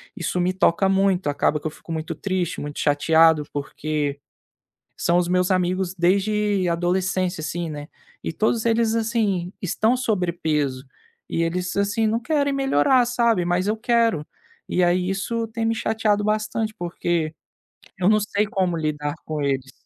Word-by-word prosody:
isso 180 - -2
me 180 +1 +1
toca 190 +1 +3
muito, 190 -3 +2
acaba 145 +1 +1
que 155 - -4
eu - - -4
fico 165 - -12
muito 160 0 -3
triste, 185 -2 -2
muito 145 0 -6
chateado, 160 +1 +4
porque 145 0 -3 0.8
são 170 +1 +2
os 175 -1 +1
meus 180 +1 +1
amigos 185 0 0
desde 195 +1 +1
adolescência, 180 0 0
assim, 170 +2 -3
né. 145 -1 -7 0.3
E - - -2
todos 220 +6 0
eles 225 0 +2
assim 215 -6 0
estão 220 +6 +1
sobrepeso, 160 - -1 0.4
e 165 - 0
eles, 180 +2 -2
assim, 205 +2 +1
não 225 +2 +1
querem 285 +1 +1
melhorar 265 - +3
sabe. 235 -6 +2
Mas 180 +3 0
eu 215 - +1
quero. 230 -9 +1 0.4
E 180 - +2
aí 180 +1 +2
isso 225 +4 -2
tem 225 0 -3
me 225 - +1
chateado 215 -2 0
bastante 215 +1 -1
porque 170 -2 -2 0.7
eu 185 +2 +3
não 215 - +4
sei 210 0 0
como 190 -5 0
lidar 150 -2 -2
com 155 -2 -3
eles. 135 -1 -1
185 Hz, 155 wpm, -23 LUFS, 165-215 Hz, 0.8 s, chateado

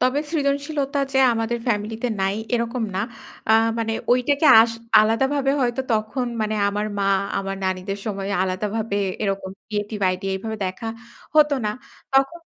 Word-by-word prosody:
তবে 255 +3 +2
সৃজনশীলতা 285 -1 -1
যে 265 - +2
আমাদের 225 +1 -1
ফ্যামিলিতে 220 +1 -1
নাই 195 +1 +1 0.2
এরকম 235 +1 -1
না। 190 - 0 0.5
আ - - +7 0.3
মানে 225 0 -1 0.2
ঐটাকে 275 +5 +3
আস 230 +1 +4 0.3
আলাদাভাবে 265 +6 +2
হয়তো 245 0 0
তখন 220 +4 -1
মানে 215 0 0
আমার 205 +1 -2
মা 195 - +1 0.3
আমার 195 0 -3
নানীদের 190 +2 -2
সময় 195 -2 -3
আলাদাভাবে 205 +3 -2 0.3
এরকম 195 -2 -2 0.2
ক্রিয়েটিভ 210 0 -3
আইডিয়া 190 +1 -3
এভাবে 220 +3 -5
দেখা 185 +5 -5 0.5
হতো 300 -1 +5
না। 210 - +1 0.4
তখন, 270 +5 +2
225 Hz, 145 wpm, -22 LUFS, 200-265 Hz, 0.5 s, আ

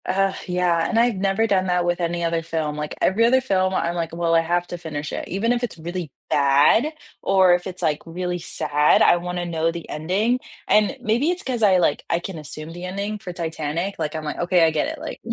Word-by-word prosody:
Ugh, 195 +1 +1
yeah, 180 -2 +1
and 225 - 0
I've 235 -1 +3
never 195 +3 +1
done 190 -3 +1
that 180 -1 +1
with 175 0 0
any 170 0 -1
other 165 0 0
film, 160 -2 -3
like, 150 0 -4
every 205 +5 +3
other 250 +3 +5
film 190 -7 +1
I'm 170 -1 0
like, 165 -1 -3
"Well, 170 -1 0
I 165 - +6
have 175 +1 0
to 175 - -6
finish 155 -3 -5
it," - - -4
even 205 +6 0
if 245 0 -2
it's 235 - -3
really 170 -1 -5 0.2
bad 145 - +4 0.3
or 190 -2 +4
if 175 +1 0
it's, 185 -1 -7
like, 150 -2 +1
really 180 +1 -3
sad, 150 -2 +2
I - - +5
wanna 175 0 -4
know 165 -1 0
the 170 0 -8
ending, 195 +11 0 0.3
and 210 +6 +3
maybe 240 +8 +1
it's 360 0 -2
'cause 250 -3 -2
I, 195 -3 +5
like, 170 -5 +1
I 170 - +2
can 175 -1 -6
assume 155 +2 -8
the 175 +1 -8
ending, 200 +3 -4
for 190 -3 -7
Titanic, 165 +2 -3
like, 155 -1 -2
I'm, 155 - -4
like, 150 - -4
"OK, 175 0 +3
I 160 - +4
get 155 - 0
it," 320 - -5
like, 315 +1 -7
175 Hz, 235 wpm, -22 LUFS, 165-195 Hz, 0.3 s, I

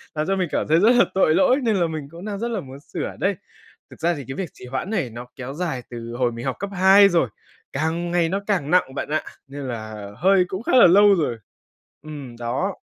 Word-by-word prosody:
làm 155 +3 -1
cho 195 - +1
mình 185 -2 0
cảm - - -1
thấy 160 +2 +4
rất 230 +5 +5
là 240 - +6
tội 165 -4 +3
lỗi 270 -2 +4
nên 225 -3 +2
là 175 -3 +2
mình 155 -3 -5
cũng 170 +3 -10
đang 205 -2 -4
rất 235 - -2
là 215 - -1
muốn 135 -2 -10
sửa - - -6
đây. - - +1 0.5
Thực - - -15
ra 170 +2 +1
thì 140 - -7
cái 135 - -5
việc 185 -6 -4
trì - - -12
hoãn 135 +9 -4
này 170 - -1
nó 120 +2 -8
kéo 130 +1 -7
dài 155 -6 -3
từ 120 -1 -7
hồi 125 -2 +1
mình 115 +3 -7
học 135 - -1
cấp 200 +1 -4
hai 195 +2 +6
rồi, 165 - +2 0.4
càng 165 +4 -1
ngày 170 -2 +2
nó 195 +2 -1
càng 175 -8 0
nặng 180 -7 +3
bạn - - -4
ạ, 155 - 0 0.2
nên 140 +1 -8
là 110 -3 -6
hơi 185 +1 +4
cũng 190 +5 -5
khá - - -2
là 245 - +8
lâu 200 +2 +6
rồi. 135 -9 -1 0.7
Ừm, 145 -6 -9
đó. 130 +12 -2
165 Hz, 250 wpm, -22 LUFS, 130-190 Hz, 0.7 s, là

